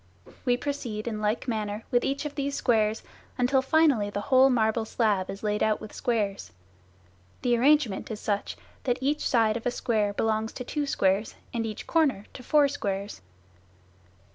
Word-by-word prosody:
We 245 Hz, -1 st, +3 dB
proceed 245 Hz, -6 st, -4 dB
in 215 Hz, -2 st, -3 dB
like 215 Hz, +5 st, -1 dB
manner 215 Hz, -2 st, -2 dB
with 245 Hz, -, +3 dB
each 275 Hz, +2 st, -2 dB
of 295 Hz, -, -4 dB
these 280 Hz, -1 st, -2 dB
squares 220 Hz, -3 st, +1 dB, 0.3 s
until 260 Hz, +1 st, +3 dB
finally 265 Hz, -7 st, +3 dB
the 205 Hz, -, -3 dB
whole 260 Hz, +1 st, +7 dB
marble 225 Hz, -2 st, +2 dB
slab 210 Hz, -4 st, 0 dB
is 195 Hz, -, -7 dB
laid 210 Hz, 0 st, 0 dB
out 215 Hz, -1 st, +2 dB
with 215 Hz, -, -10 dB
squares. 215 Hz, -6 st, -2 dB, 0.9 s
The 245 Hz, -2 st, +3 dB
arrangement 260 Hz, -4 st, +2 dB
is 215 Hz, -2 st, -5 dB
such, 205 Hz, -2 st, -2 dB, 0.3 s
that 245 Hz, -2 st, +1 dB
each 290 Hz, +3 st, 0 dB
side 225 Hz, -2 st, +3 dB
of 235 Hz, -, -4 dB
a -, -, +3 dB
square 220 Hz, -4 st, 0 dB
belongs 220 Hz, +1 st, -1 dB
to 250 Hz, -, -6 dB
two 290 Hz, +3 st, -3 dB
squares 195 Hz, -3 st, +1 dB, 0.2 s
and 230 Hz, -1 st, -1 dB
each 215 Hz, -, -6 dB
corner 285 Hz, -11 st, +1 dB
to -, -, -9 dB
four 295 Hz, +3 st, +4 dB
squares. 200 Hz, -, -4 dB
230 Hz, 170 wpm, -27 LUFS, 210-265 Hz, 0.9 s, whole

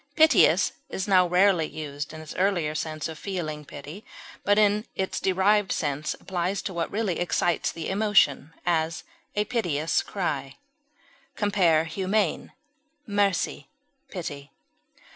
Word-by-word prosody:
Piteous 315 Hz, -1 st, +5 dB, 0.2 s
is 190 Hz, -, -3 dB
now 185 Hz, -2 st, +5 dB
rarely 180 Hz, -2 st, +3 dB
used 145 Hz, -2 st, -6 dB
in 155 Hz, 0 st, -8 dB
its 155 Hz, -, -8 dB
earlier 180 Hz, -5 st, +1 dB
sense 155 Hz, 0 st, -3 dB
of 160 Hz, -2 st, -8 dB
feeling 160 Hz, -6 st, -4 dB
pity, 150 Hz, +8 st, -10 dB, 0.4 s
but 205 Hz, +1 st, +3 dB
in 210 Hz, +1 st, +3 dB
its 190 Hz, 0 st, -2 dB
derived 195 Hz, +2 st, +2 dB
sense 145 Hz, 0 st, -1 dB
applies 190 Hz, +1 st, -2 dB
to 190 Hz, -, -4 dB
what 170 Hz, -1 st, -2 dB
really 205 Hz, -5 st, -1 dB
excites 175 Hz, -1 st, +1 dB
the 165 Hz, -, -6 dB
emotion; 190 Hz, -8 st, +2 dB
as, 160 Hz, -2 st, 0 dB, 0.3 s
a 210 Hz, 0 st, +1 dB
piteous 165 Hz, -9 st, 0 dB
cry. 145 Hz, -8 st, -3 dB, 0.8 s
Compare 185 Hz, -7 st, +3 dB
HUMANE; 190 Hz, +2 st, -1 dB, 0.5 s
MERCY; 200 Hz, -4 st, 0 dB, 0.4 s
PITY. 145 Hz, -6 st, -6 dB
175 Hz, 125 wpm, -26 LUFS, 155-200 Hz, 0.8 s, Piteous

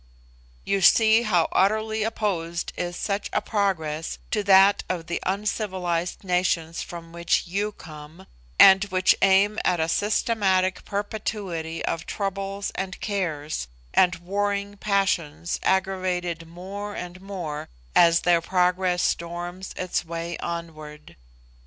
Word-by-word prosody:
You 195 Hz, -, 0 dB
see 220 Hz, +4 st, +6 dB
how 180 Hz, -8 st, +2 dB
utterly 220 Hz, +3 st, +1 dB
opposed 185 Hz, -6 st, -2 dB
is 175 Hz, 0 st, -4 dB
such 200 Hz, 0 st, -2 dB
a -, -, +3 dB
progress 165 Hz, -7 st, -2 dB
to 210 Hz, -, +1 dB
that 195 Hz, +1 st, +6 dB
of 175 Hz, -3 st, -2 dB
the 170 Hz, -, -3 dB
uncivilised 190 Hz, -4 st, -2 dB
nations 180 Hz, -3 st, 0 dB
from 170 Hz, -1 st, -8 dB
which 170 Hz, 0 st, 0 dB
you 200 Hz, +4 st, -2 dB
come, 155 Hz, +2 st, -12 dB, 0.3 s
and 195 Hz, 0 st, +8 dB
which 185 Hz, -2 st, +3 dB
aim 195 Hz, +2 st, +4 dB
at 175 Hz, -, +1 dB
a 160 Hz, -, +1 dB
systematic 195 Hz, -1 st, +1 dB
perpetuity 200 Hz, -5 st, -4 dB
of 165 Hz, -, -3 dB
troubles, 195 Hz, 0 st, -3 dB
and 190 Hz, -1 st, -5 dB
cares, 155 Hz, -, -3 dB, 0.3 s
and 180 Hz, -1 st, +4 dB
warring 200 Hz, +2 st, -2 dB
passions 175 Hz, -6 st, -1 dB
aggravated 180 Hz, -3 st, -1 dB
more 195 Hz, +5 st, -7 dB
and 180 Hz, +1 st, -7 dB
more 175 Hz, -7 st, -6 dB, 0.3 s
as 170 Hz, -1 st, +6 dB
their 175 Hz, -1 st, +3 dB
progress 180 Hz, 0 st, +1 dB
storms 175 Hz, +2 st, -3 dB
its 185 Hz, -1 st, -1 dB
way 170 Hz, 0 st, -5 dB
onward. 155 Hz, -3 st, -7 dB
185 Hz, 120 wpm, -25 LUFS, 170-200 Hz, 0.3 s, and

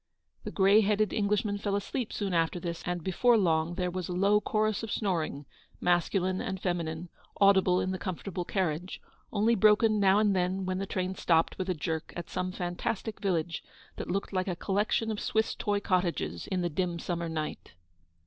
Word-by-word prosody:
The -, -, -4 dB
grey 200 Hz, +2 st, +5 dB
headed 210 Hz, 0 st, +1 dB
Englishman 205 Hz, -1 st, 0 dB
fell 200 Hz, -1 st, -1 dB
asleep 215 Hz, +4 st, -3 dB
soon 200 Hz, -3 st, -2 dB
after 165 Hz, +1 st, +1 dB
this, 170 Hz, -1 st, -4 dB
and 175 Hz, -2 st, -2 dB
before 230 Hz, +7 st, +3 dB
long 165 Hz, -3 st, +1 dB
there 180 Hz, 0 st, -1 dB
was 180 Hz, -1 st, -4 dB
a -, -, -2 dB
low 200 Hz, +3 st, +3 dB
chorus 215 Hz, -1 st, 0 dB
of 225 Hz, -2 st, -5 dB
snoring, 165 Hz, -8 st, -1 dB, 0.3 s
masculine 180 Hz, +2 st, +1 dB
and 190 Hz, -1 st, -3 dB
feminine, 170 Hz, -2 st, -2 dB, 0.3 s
audible 190 Hz, -2 st, +5 dB
in 185 Hz, -, -1 dB
the 185 Hz, -, -3 dB
comfortable 180 Hz, 0 st, -4 dB
carriage; 180 Hz, -1 st, -2 dB, 0.3 s
only 220 Hz, +2 st, +3 dB
broken 215 Hz, 0 st, +4 dB
now 195 Hz, 0 st, +5 dB
and 210 Hz, -2 st, +3 dB
then, 185 Hz, +1 st, 0 dB
when 185 Hz, 0 st, -1 dB
the 195 Hz, -, -3 dB
train 185 Hz, 0 st, -2 dB
stopped 165 Hz, -3 st, +2 dB
with 185 Hz, 0 st, -2 dB
a 180 Hz, -, +1 dB
jerk 160 Hz, +1 st, -3 dB
at 175 Hz, -, -6 dB
some 185 Hz, 0 st, -2 dB
fantastic 185 Hz, +4 st, -3 dB
village 170 Hz, -4 st, -1 dB, 0.3 s
that -, -, -5 dB
looked 195 Hz, +2 st, -2 dB
like 185 Hz, 0 st, 0 dB
a 180 Hz, -, -1 dB
collection 210 Hz, +4 st, 0 dB
of 210 Hz, -, -3 dB
Swiss 220 Hz, 0 st, 0 dB
toy 205 Hz, -1 st, -1 dB
cottages 175 Hz, -, -1 dB
in 185 Hz, -1 st, -1 dB
the 175 Hz, -, 0 dB
dim 175 Hz, +1 st, -1 dB
summer 170 Hz, 0 st, -3 dB
night. 155 Hz, -, -5 dB
185 Hz, 185 wpm, -29 LUFS, 175-205 Hz, 0.3 s, grey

